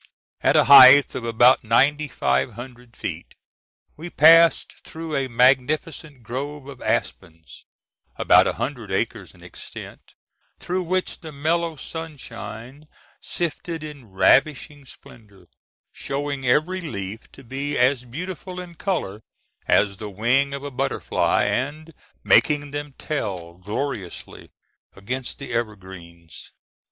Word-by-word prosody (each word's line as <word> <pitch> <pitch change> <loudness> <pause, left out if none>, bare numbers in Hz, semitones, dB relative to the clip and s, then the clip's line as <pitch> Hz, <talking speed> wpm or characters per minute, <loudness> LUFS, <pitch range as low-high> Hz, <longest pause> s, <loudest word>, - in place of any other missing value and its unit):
At - - +2
a - - +6
height 140 0 +9
of 125 - -5
about 120 +2 +4
ninety 145 +7 +2
five 65 - -1
hundred 120 +1 -12
feet - - -7 0.6
we 165 +3 -8
passed 165 +1 +5
through 160 -1 -7
a 135 -1 -1
magnificent 130 +3 +1
grove 140 +5 -6
of 140 -3 -11
aspens, 80 -5 -4 0.5
about - - +4
a - - -1
hundred - - -5
acres - - -3
in - - -18
extent, - - -12 0.4
through 185 +1 -3
which 185 +1 -2
the 160 -2 -10
mellow 160 +3 -1
sunshine 135 -4 -9 0.3
sifted 170 -1 -4
in 145 -7 -10
ravishing 140 +8 +2
splendor, 105 -7 -16 0.4
showing 140 -1 -4
every 170 +9 +1
leaf 105 - -7
to 135 - -14
be 140 +4 -4
as 125 +1 +2
beautiful 180 +7 -7
in 180 -1 -9
color 155 - -3 0.5
as 100 -2 +2
the 105 +2 -7
wing 120 +8 +1
of 140 - -8
a 145 - -6
butterfly, 125 - 0
and 155 +5 -3 0.3
making 145 -1 +3
them 145 -1 -6
tell 95 - -4
gloriously 105 -1 -6 0.5
against 125 +6 -5
the - - -8
evergreens. 95 -7 -7
135 Hz, 125 wpm, -22 LUFS, 115-155 Hz, 0.6 s, height